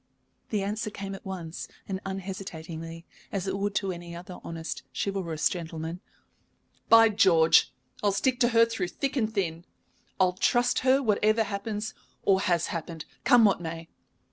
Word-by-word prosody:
The 210 -3 0
answer 210 +2 -2
came 195 -1 -6
at 195 - -9
once 175 -4 -6 0.2
and 190 -1 -3
unhesitatingly, 170 -4 -6 0.3
as 195 -2 -2
it 190 0 -1
would 205 +1 -1
to 195 -2 0
any 170 -1 -7
other 180 +1 -9
honest, 165 0 -5 0.2
chivalrous 180 -6 0
gentleman. 165 0 -5 0.9
"By 225 0 +8
George, 170 -6 +5 0.3
I'll 205 - +3
stick 250 +6 +1
to 240 - +5
her 230 -1 +5
through 225 -6 -2
thick 275 +10 -3
and 220 -5 +1
thin! 170 -6 -2 0.6
I'll 185 -1 +4
trust 240 +6 +2
her 265 +2 +3
whatever 215 0 +3
happens 210 +1 -4 0.3
or 195 -1 +4
has 175 -4 +1
happened, 165 -1 -5 0.2
come 245 -4 +7
what 195 -3 +3
may. 165 0 -6
195 Hz, 155 wpm, -28 LUFS, 170-215 Hz, 0.9 s, By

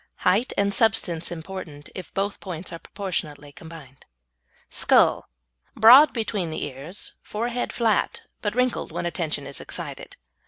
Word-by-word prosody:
Height 210 +8 +3
and 200 0 +2
substance 190 -7 +2
important 160 -3 -8
if 185 - -8
both 200 +1 -1
points 180 -2 -6
are 165 - -6
proportionately 155 -8 -5
combined. 150 -4 -13 0.6
SKULL - - +3 0.5
Broad 260 +7 +9
between 210 -6 -2
the 155 - -4
ears, 145 +7 -7
forehead 240 +3 -3
flat, 225 -3 +1 0.2
but 205 0 -2
wrinkled 250 0 0
when - - -3
attention 160 -4 -2
is 140 0 -5
excited. - - -7
185 Hz, 130 wpm, -24 LUFS, 160-215 Hz, 0.6 s, Broad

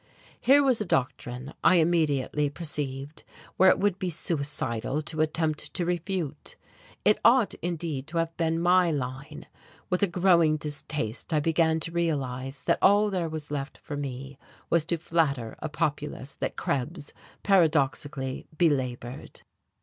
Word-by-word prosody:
Here 285 +2 +5
was 255 -5 +2
a - - -1
doctrine, 130 -2 -2
I - - +6
immediately 150 -4 +2
perceived, 145 -2 -5 0.3
which 190 - +7
it - - +4
would 200 -2 0
be 185 - -1
suicidal 145 -5 -2
to 155 +1 -2
attempt 155 -1 -1
to 175 - 0
refute. 175 -3 -3 0.5
It 210 - +4
ought, 235 -2 +5
indeed, 165 -5 -3
to 165 +1 -4
have 165 0 -1
been 165 -1 0
my 180 +1 +4
line. 140 +1 -4 0.5
With 180 - +1
a 200 - +4
growing 170 -3 +3
distaste 145 -4 -4
I 155 - +3
began 160 +1 +2
to 165 - -3
realize 135 -6 -2
that - - +2
all 205 +2 +5
there 175 -4 -1
was 155 -2 -6
left 140 -1 -4
for 150 - -7
me 135 -1 -6 0.3
was 165 -2 +3
to 170 - -1
flatter 145 -8 0
a 155 - -4
populace 145 -1 -3
that - - -4
Krebs, 145 +3 -3 0.3
paradoxically, 145 -7 +1
belaboured. 130 -6 -1
155 Hz, 145 wpm, -27 LUFS, 140-170 Hz, 0.5 s, which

